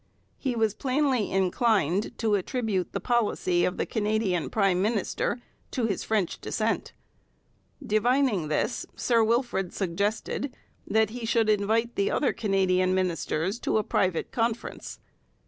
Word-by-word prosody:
He 260 Hz, -3 st, -1 dB
was 220 Hz, -3 st, +1 dB
plainly 260 Hz, -2 st, +1 dB
inclined 195 Hz, -1 st, +1 dB
to 220 Hz, -2 st, +1 dB
attribute 205 Hz, -2 st, -1 dB
the -, -, -2 dB
policy 210 Hz, -7 st, +1 dB
of 180 Hz, -, -2 dB
the -, -, 0 dB
Canadian 210 Hz, -5 st, 0 dB
prime 195 Hz, -4 st, +2 dB
minister 215 Hz, +3 st, 0 dB, 0.3 s
to 245 Hz, -, -1 dB
his 200 Hz, -4 st, -1 dB
French 210 Hz, -6 st, -1 dB
descent. -, -, -1 dB, 0.9 s
Divining 230 Hz, -, +2 dB
this, 155 Hz, +10 st, -1 dB
Sir 230 Hz, -2 st, +2 dB
Wilfrid 230 Hz, -5 st, 0 dB
suggested 205 Hz, +8 st, -2 dB, 0.3 s
that 220 Hz, 0 st, +2 dB
he 240 Hz, 0 st, -6 dB
should 225 Hz, -1 st, +2 dB
invite 220 Hz, +3 st, +1 dB
the 200 Hz, -, +1 dB
other 285 Hz, -, +1 dB
Canadian 185 Hz, -3 st, +2 dB
ministers 185 Hz, +2 st, -1 dB
to -, -, 0 dB
a 215 Hz, -, +1 dB
private 185 Hz, -4 st, 0 dB
conference. 230 Hz, 0 st, -3 dB
215 Hz, 130 wpm, -27 LUFS, 185-235 Hz, 0.9 s, prime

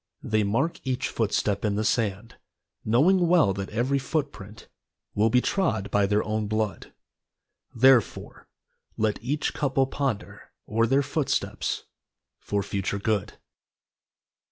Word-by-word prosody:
They 110 Hz, 0 st, +1 dB
mark 125 Hz, +12 st, 0 dB
each 130 Hz, +1 st, -2 dB
footstep 105 Hz, -2 st, -1 dB
in 105 Hz, -2 st, 0 dB
the 105 Hz, -, 0 dB
sand, 110 Hz, 0 st, -1 dB, 0.5 s
Knowing 170 Hz, -, +3 dB
well 165 Hz, -, +4 dB
that 95 Hz, 0 st, -5 dB
every 125 Hz, +5 st, 0 dB
foot 145 Hz, +1 st, -2 dB
print 105 Hz, +2 st, -12 dB, 0.5 s
Will 110 Hz, +2 st, +2 dB
be 125 Hz, +3 st, +3 dB
trod 110 Hz, -, -1 dB
by 100 Hz, -1 st, +3 dB
their 105 Hz, +1 st, +1 dB
own 110 Hz, 0 st, -2 dB
blood, 110 Hz, -4 st, -2 dB, 0.8 s
Therefore, 130 Hz, -1 st, +2 dB, 0.5 s
let 110 Hz, 0 st, -1 dB
each 145 Hz, +5 st, -1 dB
couple 135 Hz, -1 st, +1 dB
ponder 130 Hz, -6 st, -4 dB
O'er 115 Hz, +1 st, +1 dB
their 135 Hz, +4 st, +3 dB
footsteps 145 Hz, +1 st, -2 dB, 0.6 s
For 100 Hz, -1 st, -2 dB
future 100 Hz, 0 st, -2 dB
good. 105 Hz, 0 st, -1 dB
110 Hz, 130 wpm, -26 LUFS, 105-135 Hz, 0.8 s, well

